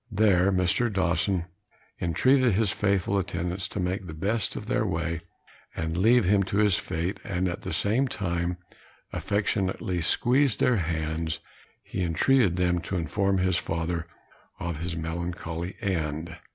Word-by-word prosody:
There 100 Hz, -2 st, +4 dB
Mr. 95 Hz, +6 st, +2 dB
Dawson 90 Hz, -1 st, +1 dB, 0.6 s
entreated 130 Hz, -, +3 dB
his 105 Hz, 0 st, +2 dB
faithful 100 Hz, 0 st, +1 dB
attendants 90 Hz, 0 st, -2 dB
to 105 Hz, -, -5 dB
make 90 Hz, +1 st, -2 dB
the 80 Hz, -, -7 dB
best 100 Hz, +6 st, -1 dB
of -, -, -5 dB
their -, -, +1 dB
way, 80 Hz, 0 st, -2 dB, 0.5 s
and 80 Hz, 0 st, -2 dB
leave 115 Hz, +5 st, +4 dB
him 100 Hz, +2 st, +4 dB
to 100 Hz, -, -2 dB
his 105 Hz, -4 st, +4 dB
fate; 90 Hz, +3 st, -3 dB
and 95 Hz, -1 st, -1 dB
at 85 Hz, -, -3 dB
the -, -, -5 dB
same 105 Hz, +11 st, +2 dB
time, 85 Hz, -5 st, -2 dB, 0.6 s
affectionately 95 Hz, -3 st, 0 dB
squeezing 125 Hz, -, +3 dB
their 125 Hz, -2 st, +3 dB
hands, 80 Hz, -1 st, -2 dB, 0.5 s
he 95 Hz, -, -4 dB
entreated 90 Hz, -, +3 dB
them 90 Hz, -1 st, +2 dB
to 95 Hz, -, -4 dB
inform 95 Hz, +4 st, +1 dB
his 95 Hz, -1 st, +2 dB
father 85 Hz, 0 st, -2 dB, 0.5 s
of 85 Hz, -2 st, -3 dB
his 85 Hz, +1 st, -3 dB
melancholy 85 Hz, +1 st, -4 dB
end. 80 Hz, -5 st, -2 dB
90 Hz, 145 wpm, -27 LUFS, 85-100 Hz, 0.6 s, There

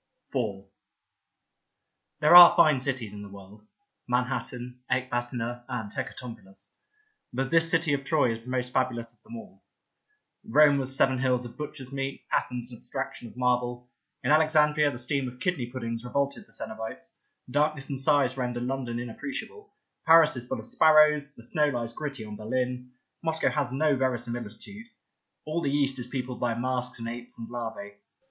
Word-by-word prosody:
Beauty 130 Hz, -, +1 dB
49 100 Hz, -4 st, -5 dB
IV -, -, -33 dB, 1.5 s
THERE 155 Hz, +3 st, +7 dB
are 175 Hz, -1 st, +12 dB
fine 150 Hz, -4 st, +5 dB
cities 125 Hz, -6 st, -3 dB
in 105 Hz, -, -8 dB
the 100 Hz, -, -9 dB
world 100 Hz, +2 st, -14 dB, 0.2 s
— -, -, -54 dB
Manhattan, 125 Hz, 0 st, -2 dB
Ecbatana 120 Hz, -1 st, -2 dB
and 110 Hz, -4 st, -4 dB
Hecatompylus 115 Hz, -7 st, -8 dB, 0.3 s
— 430 Hz, 0 st, -44 dB
but 135 Hz, +1 st, -1 dB
this 165 Hz, 0 st, +4 dB
city 165 Hz, -2 st, +2 dB
of 140 Hz, -1 st, -1 dB
Troy 140 Hz, -5 st, +2 dB
is 115 Hz, 0 st, -8 dB
the 125 Hz, -, -10 dB
most 125 Hz, -1 st, -2 dB
fabulous 120 Hz, -3 st, -1 dB
of -, -, -26 dB
them 225 Hz, +2 st, -11 dB
all. 225 Hz, -, -13 dB, 0.8 s
Rome 150 Hz, -2 st, +5 dB
was 135 Hz, 0 st, 0 dB
seven 130 Hz, -1 st, +3 dB
hills 125 Hz, -1 st, +1 dB
of 120 Hz, 0 st, -10 dB
butcher's 135 Hz, -2 st, -7 dB
meat, 135 Hz, 0 st, -4 dB
Athens 125 Hz, 0 st, -1 dB
an 120 Hz, -, -9 dB
abstraction 120 Hz, -, -4 dB
of 115 Hz, -, -15 dB
marble, 125 Hz, -1 st, 0 dB, 0.3 s
in -, -, +1 dB
Alexandria 150 Hz, -1 st, +4 dB
the 140 Hz, -, -6 dB
steam 130 Hz, +2 st, -1 dB
of 125 Hz, 0 st, -9 dB
kidney 170 Hz, -8 st, -1 dB
puddings 115 Hz, -2 st, -5 dB
revolted 140 Hz, -, -2 dB
the -, -, -23 dB
coenobites, 110 Hz, 0 st, -7 dB, 0.3 s
darkness 150 Hz, 0 st, +1 dB
and 135 Hz, -2 st, -3 dB
size 135 Hz, -2 st, +2 dB
render 125 Hz, -1 st, -2 dB
London 125 Hz, -1 st, -3 dB
inappreciable, 280 Hz, -, -7 dB, 0.4 s
Paris 160 Hz, -2 st, +7 dB
is 120 Hz, -1 st, -6 dB
full -, -, -2 dB
of 110 Hz, -, -9 dB
sparrows, 150 Hz, -2 st, +4 dB
the 115 Hz, -, -12 dB
snow 150 Hz, +5 st, +1 dB
lies 120 Hz, -3 st, -3 dB
gritty 135 Hz, -6 st, -5 dB
on 105 Hz, -1 st, -8 dB
BerHn, 125 Hz, +3 st, -2 dB, 0.3 s
Moscow 160 Hz, -1 st, +1 dB
has 145 Hz, -5 st, -1 dB
no 145 Hz, +2 st, +2 dB
veri 130 Hz, -2 st, +1 dB
similitude, 120 Hz, -, -8 dB, 0.6 s
all 155 Hz, +2 st, -2 dB
the 140 Hz, -, 0 dB
East 135 Hz, -2 st, +1 dB
is 120 Hz, -, -5 dB
peopled 125 Hz, -1 st, -4 dB
by 120 Hz, -2 st, 0 dB
masks 125 Hz, +1 st, -2 dB
and 115 Hz, -1 st, -6 dB
apes 120 Hz, +1 st, -7 dB
and 115 Hz, -, -7 dB
larvae. 110 Hz, -4 st, -6 dB
125 Hz, 175 wpm, -27 LUFS, 120-145 Hz, 1.5 s, are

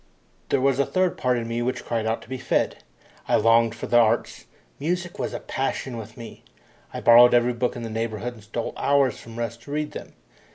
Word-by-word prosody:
There 140 Hz, -, +2 dB
was 135 Hz, 0 st, +2 dB
a 140 Hz, -, +3 dB
third 185 Hz, -1 st, +1 dB
part 125 Hz, -1 st, +1 dB
in 115 Hz, -1 st, -3 dB
me 115 Hz, +1 st, -2 dB
which 125 Hz, +2 st, -2 dB
cried 115 Hz, -2 st, -1 dB
out 110 Hz, +1 st, -1 dB
to -, -, -17 dB
be 130 Hz, +1 st, -5 dB
fed. -, -, -1 dB, 0.4 s
I -, -, +3 dB
longed 115 Hz, +1 st, +4 dB
for 115 Hz, -, -6 dB
the 120 Hz, -, +4 dB
arts. 115 Hz, -2 st, +1 dB, 0.3 s
Music 175 Hz, +4 st, -3 dB
was -, -, -2 dB
a -, -, -5 dB
passion 135 Hz, -1 st, -3 dB
with 110 Hz, -1 st, -9 dB
me. 115 Hz, -1 st, -10 dB, 0.5 s
I -, -, -6 dB
borrowed 120 Hz, +1 st, +7 dB
every 120 Hz, +1 st, +3 dB
book 120 Hz, +1 st, -1 dB
in 120 Hz, -, -6 dB
the 115 Hz, -, -4 dB
neighbourhood 115 Hz, +1 st, -3 dB
and 110 Hz, -3 st, -15 dB
stole 115 Hz, +2 st, -4 dB
hours 140 Hz, -3 st, +2 dB
from 115 Hz, 0 st, -11 dB
rest 115 Hz, 0 st, -4 dB
to 140 Hz, -, -11 dB
read 150 Hz, 0 st, -2 dB
them. -, -, -9 dB
120 Hz, 220 wpm, -24 LUFS, 115-130 Hz, 0.5 s, borrowed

